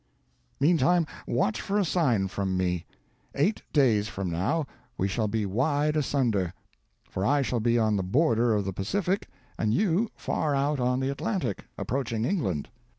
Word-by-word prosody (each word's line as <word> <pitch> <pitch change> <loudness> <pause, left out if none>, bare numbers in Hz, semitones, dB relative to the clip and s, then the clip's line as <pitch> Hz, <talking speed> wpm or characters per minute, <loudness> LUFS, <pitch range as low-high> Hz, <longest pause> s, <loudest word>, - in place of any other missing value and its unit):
Meantime, 170 +3 +4 0.2
watch 110 -2 0
for 200 - -1
a 205 - +2
sign 130 - +2
from 95 -1 -2
me. 90 -2 -1 0.5
Eight 180 +10 +1
days 115 -8 +3
from 95 -5 -4
now, 115 - 0 0.3
we 95 - +1
shall 110 +3 0
be 110 0 -1
wide 145 +9 +1
asunder; 120 - 0 0.5
for 95 - -3
I 140 +5 +3
shall 120 0 -1
be 120 +1 +2
on 110 -2 +2
the 95 - -1
border 120 - +2
of 100 -2 0
the 95 - -2
Pacific, 185 - -1 0.3
and 110 0 +1
you 205 +3 +2
far 150 -3 -1
out 140 +1 +1
on 125 +1 +1
the 135 +1 0
Atlantic, 185 - -2
approaching 115 -4 -2
England. 95 - -1
120 Hz, 160 wpm, -27 LUFS, 100-150 Hz, 0.5 s, Meantime